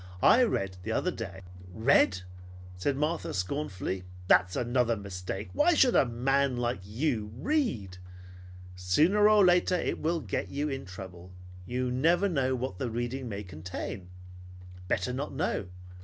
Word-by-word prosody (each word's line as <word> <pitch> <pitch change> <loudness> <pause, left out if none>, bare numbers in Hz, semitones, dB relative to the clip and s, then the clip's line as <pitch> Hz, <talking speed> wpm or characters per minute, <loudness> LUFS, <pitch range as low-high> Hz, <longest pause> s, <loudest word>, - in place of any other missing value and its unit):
"I 250 - +7
read 95 - 0
the 110 +5 -4
other 180 +10 0
day 95 - -7 0.2
" - - -15
"Read!" 110 -4 +3 0.5
said 135 +10 -1
Martha 150 - -1
scornfully. 95 -3 -3 0.2
"That's 95 0 +4
another 120 -1 +1
mistake. 95 0 -6
Why 325 +4 +4
should 260 -5 +4
a 135 - +5
man 135 +2 +1
like 120 -4 -1
you 110 0 -2
read? 125 - -1 0.8
Sooner 160 - +3
or 210 -2 +6
later 180 0 +4
it 175 - -1
will 165 +2 0
get - - -3
you 145 +2 -2
in 135 -7 -4
trouble. 90 -1 -10 0.3
You 125 +2 -1
never 170 +9 +3
know 135 -7 0
what 125 -7 -4
the 125 - -2
reading 120 +2 -3
may 100 -1 -5
contain. 90 +1 -7 0.8
Better 90 +7 0
not 140 +3 -4
know. 140 - -1
120 Hz, 150 wpm, -29 LUFS, 95-150 Hz, 0.8 s, I